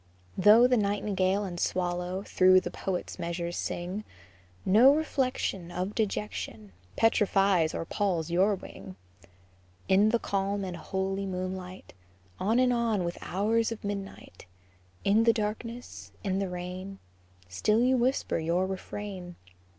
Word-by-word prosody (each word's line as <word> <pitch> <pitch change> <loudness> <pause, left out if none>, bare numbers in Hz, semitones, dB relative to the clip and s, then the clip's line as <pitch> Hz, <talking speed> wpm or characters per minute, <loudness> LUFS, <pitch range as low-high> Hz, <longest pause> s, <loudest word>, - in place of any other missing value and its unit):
Though 210 +5 +7
the 250 0 +4
nightingale 200 -1 0
and 175 -3 -5
swallow 180 +1 -1
Through 185 -2 +5
the - - -5
poet's 185 -2 -4
measures 170 0 -3
sing, 180 +5 -4 0.6
No 245 +9 +7
reflection 255 - -1
Of 185 +3 -3
dejection 210 - -3 0.2
Petrifies 195 -6 +3
or - - -3
palls 170 -4 -1
your 195 +4 +3
wing. 95 - -11 0.9
In 200 +3 +5
the 235 - +3
calm 200 -1 -2
and 185 -2 -4
holy 190 +3 -3
moonlight, 185 0 -6 0.5
On 220 +5 +1
and 250 -1 +4
on 230 -5 +1
with 170 0 -4
hours 225 +4 0
of 230 - -6
midnight, 195 - -7 0.6
In 210 +3 +4
the 230 0 +5
darkness, 215 - -5
in 190 0 0
the 195 -2 -2
rain, 180 +2 -6 0.5
Still 210 - +1
you 260 +1 +4
whisper 255 -6 0
your 170 +3 +1
refrain. 190 -1 -6
195 Hz, 130 wpm, -28 LUFS, 180-215 Hz, 0.9 s, Though